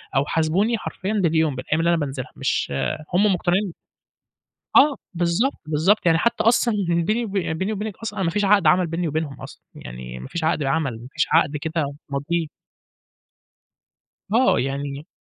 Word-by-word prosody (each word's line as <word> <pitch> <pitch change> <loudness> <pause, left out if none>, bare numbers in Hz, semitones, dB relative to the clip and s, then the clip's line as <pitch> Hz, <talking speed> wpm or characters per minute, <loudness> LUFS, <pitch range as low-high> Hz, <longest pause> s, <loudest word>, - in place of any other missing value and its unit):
أو 135 +1 +3
حاسبوني 175 +10 +1
حرفيًا 200 -1 -4
باليوم، 160 -7 +2
بالأيام 135 +5 -1
اللي 165 +1 +2
أنا 170 - +3
بانزلها، 135 -4 -4
مش - - -1 0.4
هُم 200 +2 +4
مقتنعين 180 +1 0 1.0
آه، 285 0 +6 0.2
بالضبط، 175 +10 0
بالضبط 175 +7 +2
يعني، 165 -1 +5
حتى 235 +6 +1
أصلًا 235 0 +3
بيني 175 +8 +1
وب 210 - -6
بيني 190 +3 -2
وبينك، 210 -1 -4
أصلًا 215 -2 -6
أنا 190 - 0
ما 165 - +1
فيش 205 +4 0
عقد 200 -3 +4
عمل 180 +4 +4
بيني 165 +1 -2
وبينهم 150 -3 -3
أصلًا - - -11
يعني، 60 0 -8
ما 65 - -9
فيش 170 - -4
عقد 160 0 +1
العمل، 135 -4 -1
ما 125 - -10
فيش 155 - +1
عقد 145 +1 +3
كده 150 -1 -2
ماضيه. 150 +4 -1 1.9
آه 250 +4 +4
يعني 140 +2 -4
165 Hz, 165 wpm, -22 LUFS, 145-200 Hz, 1.9 s, آه